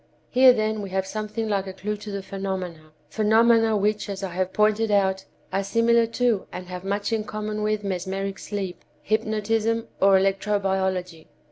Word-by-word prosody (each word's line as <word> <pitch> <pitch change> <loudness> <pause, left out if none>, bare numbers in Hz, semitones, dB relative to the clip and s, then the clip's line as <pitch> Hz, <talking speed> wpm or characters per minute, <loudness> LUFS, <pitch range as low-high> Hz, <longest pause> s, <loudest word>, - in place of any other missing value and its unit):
"Here, 255 0 +8
then, 215 -2 0
we 200 - -6
have 190 0 -1
something 215 +2 -4
like 200 -2 -1
a 190 - -6
clue 210 +3 -3
to 210 +1 -9
the 200 -1 -4
phenomena—phenomena 195 +5 +1
which, 210 +1 0
as 195 0 -5
I 190 - -3
have 185 +1 -1
pointed 215 +2 +2
out, 190 -2 +2 0.3
are 195 +1 +1
similar 230 +3 +3
to 230 -3 0
and 180 - -7
have 180 0 -6
much 200 +3 -1
in 220 -1 0
common 215 0 -4
with 215 0 0
mesmeric 195 +1 -3
sleep, 195 -3 -5 0.2
hypnotism 220 +1 0
or 195 0 +6
electro 195 +2 +1
biology. 190 -4 -2
205 Hz, 165 wpm, -24 LUFS, 190-215 Hz, 0.3 s, Here